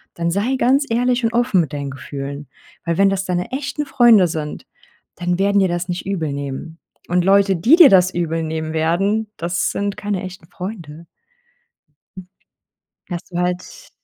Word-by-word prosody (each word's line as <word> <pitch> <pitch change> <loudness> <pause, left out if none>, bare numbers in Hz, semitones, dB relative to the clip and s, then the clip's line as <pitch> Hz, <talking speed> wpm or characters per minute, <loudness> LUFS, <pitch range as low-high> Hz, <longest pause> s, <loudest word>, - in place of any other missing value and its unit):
dann 170 0 -1
sei 210 +9 0
ganz 270 +4 +2
ehrlich 245 +2 +1
und 230 - 0
offen 240 -6 +2
mit 155 -2 -5
deinen 140 -1 -4
Gefühlen. 140 +1 -7 0.4
Weil 170 -1 -1
wenn 195 0 +4
das 195 -1 -2
deine 180 -1 -2
echten 285 +2 -3
Freunde 235 -8 +5
sind, 155 -2 -5 0.5
dann 175 0 -1
werden 200 +1 +3
dir 190 - +3
das 175 +1 -3
nicht 175 0 -4
übel 165 -7 -2
nehmen. 140 +4 -6 0.3
Und 180 0 +2
Leute, 195 0 +4
die 235 - +5
dir 335 -5 +9
das 185 -1 +4
übel 165 -1 -1
nehmen 160 0 -4
werden. 195 +7 0
Das 175 +1 -1
sind 200 0 -2
keine 205 -2 -3
echten 185 -3 -9
Freunde. 170 -4 -8 2.0
Hast 175 0 -6
du 175 - -4
halt 180 - -4
180 Hz, 165 wpm, -19 LUFS, 165-205 Hz, 2.0 s, dir